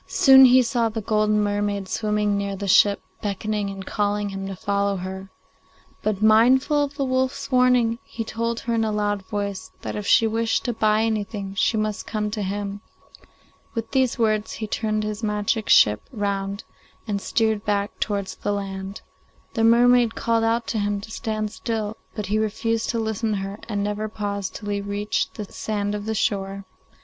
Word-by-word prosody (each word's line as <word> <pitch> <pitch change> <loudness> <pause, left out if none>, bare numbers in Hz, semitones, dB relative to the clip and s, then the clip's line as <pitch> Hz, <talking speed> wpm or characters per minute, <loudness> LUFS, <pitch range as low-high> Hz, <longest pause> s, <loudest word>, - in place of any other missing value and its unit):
Soon 265 -1 +7
he 255 0 +6
saw 235 -1 +1
the 225 +1 -4
golden 215 0 +1
mermaid 205 -1 -1
swimming 210 0 0
near 200 0 -2
the 200 +1 -5
ship, 200 +1 +5 0.2
beckoning 205 0 -2
and 195 -1 -7
calling 205 0 -1
to - - -8
him 195 0 -5
to 195 - -5
follow 200 +1 0
her; 190 +1 -6 0.7
but, 215 -1 -1
mindful 255 +7 +5
of 285 0 -4
the 275 - 0
wolf's 260 +1 -1
warning, 250 -2 +3
he 230 - -5
told 230 +1 -3
her 235 - -2
in 225 -1 +2
a 220 - 0
loud 205 -1 0
voice 200 -3 -4
that - - -4
if 210 -1 -4
she 225 - +5
wished 225 0 0
to 240 - 0
buy 215 0 +2
anything 210 -3 -2
she 220 +3 +1
must 215 -1 -2
come 210 -1 -2
to 210 0 -3
him. 200 +1 -3 0.9
With 225 -1 -4
these 260 -3 +2
words 215 -2 +1
he 220 - -4
turned 215 0 -1
his 210 0 -4
magic 210 0 -1
ship 105 0 +6
round 200 -2 -2 0.4
and 200 -2 -2
steered 220 -1 0
back 205 -1 -1
towards 200 -2 -2
the 205 - -2
land. 195 0 -5 0.5
The 225 - 0
mermaid 240 0 +5
called 230 -1 +1
out 230 +1 +1
to 220 - -1
him 205 0 0
to 220 - -10
stand 215 -1 -3
still, 220 -2 -3 0.2
but 210 -2 -3
he 210 +3 0
refused 225 +1 -1
to 230 - 0
listen 220 0 -1
to - - -1
her 195 +2 -5
and 205 -2 -1
never 210 +1 -2
paused 200 -2 -4
till 205 - -6
he 200 0 -1
reached 205 +1 -2
the 210 - -5
sand 205 0 -3
of 205 0 -4
the 220 - -1
shore. 195 -1 -1
210 Hz, 190 wpm, -23 LUFS, 200-225 Hz, 0.9 s, Soon